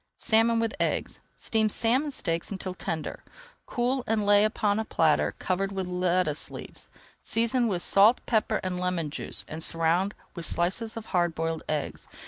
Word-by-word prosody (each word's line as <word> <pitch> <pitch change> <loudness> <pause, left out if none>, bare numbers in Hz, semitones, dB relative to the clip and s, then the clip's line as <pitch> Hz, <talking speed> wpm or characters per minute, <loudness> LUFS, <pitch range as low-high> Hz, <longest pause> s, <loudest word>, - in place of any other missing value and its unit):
SALMON 230 +1 +3
WITH 225 -1 -1
EGGS - - -1 0.2
Steam 220 -1 +1
salmon 250 +8 +1
steaks 170 -11 -2
until 190 -2 -4
tender, 160 -3 -5 0.4
cool, 250 +1 0
and 215 -1 +1
lay 205 0 +6
upon 215 -1 +1
a - - 0
platter 160 -7 +1
covered 195 +1 -1
with 190 -1 -3
lettuce 180 -3 0
leaves. - - -9 0.3
Season 235 +2 +1
with 180 -5 -1
salt, 210 +5 +5
pepper, 220 -2 +1
and 180 -1 -2
lemon 180 -4 -2
juice - - -2
and 155 +1 -6
surround 165 +5 +1 0.2
with 170 - -6
slices 205 +7 +1
of 225 - -6
hard 175 -2 +1
boiled 165 0 -2
eggs. 150 -2 -3
195 Hz, 160 wpm, -27 LUFS, 170-225 Hz, 0.4 s, lay